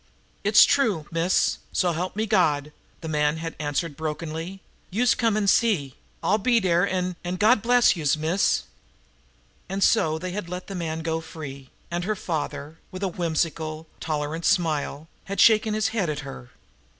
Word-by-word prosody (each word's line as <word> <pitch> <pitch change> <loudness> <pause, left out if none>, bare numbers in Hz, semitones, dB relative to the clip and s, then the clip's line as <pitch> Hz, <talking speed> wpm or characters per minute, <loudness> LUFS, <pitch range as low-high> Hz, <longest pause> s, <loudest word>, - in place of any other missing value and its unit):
"It's - - +7
true, 210 - +1
miss, 165 +3 +1
so 180 -2 +1
help 180 +3 -3
me 215 +1 0
God!" 150 -8 +2 0.3
the 160 - -6
man 150 0 +1
had 165 0 -5
answered 150 +1 -2
brokenly. 160 +4 -5 0.3
"Youse 230 +5 +3
come 225 -3 +1
an' 210 - +1
see. 195 - +2 0.3
I'll 210 +2 +2
be 235 +3 +3
dere 180 -1 +2
an' 180 -2 -2
an' 175 +1 -3
God 215 +4 +4
bless 245 -1 +4
youse, 155 -3 +1
miss!" 165 +5 +1 1.1
And 195 +1 -1
so 155 0 +3
they 180 +2 -5
had 185 -2 -5
let 180 0 -5
the 195 - -7
man 165 -3 -3
go 165 0 -1
free, 140 -5 -9 0.2
and 175 +1 -2
her 215 +2 0
father, 155 -3 -4
with 185 +1 -7
a - - +2
whimsical, 160 -2 -2
tolerant 155 +1 -3
smile, 155 -4 0 0.2
had 200 +1 -5
shaken 215 -1 +5
his 215 0 +1
head 215 -7 -1
at 150 -1 -3
her. 135 -3 -9
170 Hz, 170 wpm, -25 LUFS, 155-195 Hz, 1.1 s, It's